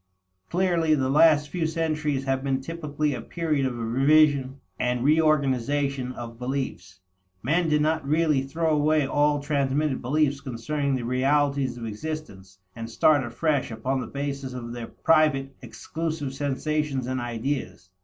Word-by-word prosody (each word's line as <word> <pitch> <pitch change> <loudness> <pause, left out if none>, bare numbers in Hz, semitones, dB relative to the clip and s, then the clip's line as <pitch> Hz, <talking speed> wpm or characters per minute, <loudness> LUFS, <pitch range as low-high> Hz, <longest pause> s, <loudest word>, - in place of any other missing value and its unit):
Clearly 170 -3 +2
the 135 -2 0
last 150 -1 +5
few 165 -1 -1
centuries 155 -4 -1
have 135 0 -1
been 135 -1 0
typically 150 0 -3
a 125 - -5
period 155 -5 -1
of 125 -2 -4
revision 135 +3 +3 0.2
and 125 0 0
reorganization 140 -3 +1
of 115 -1 -8
beliefs. 125 -8 -4 0.4
Men 165 +6 +1
did 150 -1 +3
not 160 0 +1
really 150 -1 +2
throw 160 +4 -1
away 150 0 +2
all 145 +1 +2
transmitted 140 0 0
beliefs 140 +2 +1
concerning 140 +2 -2
the 125 - -3
realities 135 0 +1
of 115 - -6
existence, 105 -6 -7 0.2
and 115 0 -6
start 145 +5 +3
afresh 145 +4 -1
upon 130 +4 -2
the 120 - -6
basis 140 -2 -4
of 120 -2 -6
their 120 -1 -6
private, 145 -4 +2
exclusive 155 +3 -4
sensations 145 0 -1
and 130 0 -2
ideas. 115 - -4
140 Hz, 145 wpm, -25 LUFS, 130-155 Hz, 0.4 s, last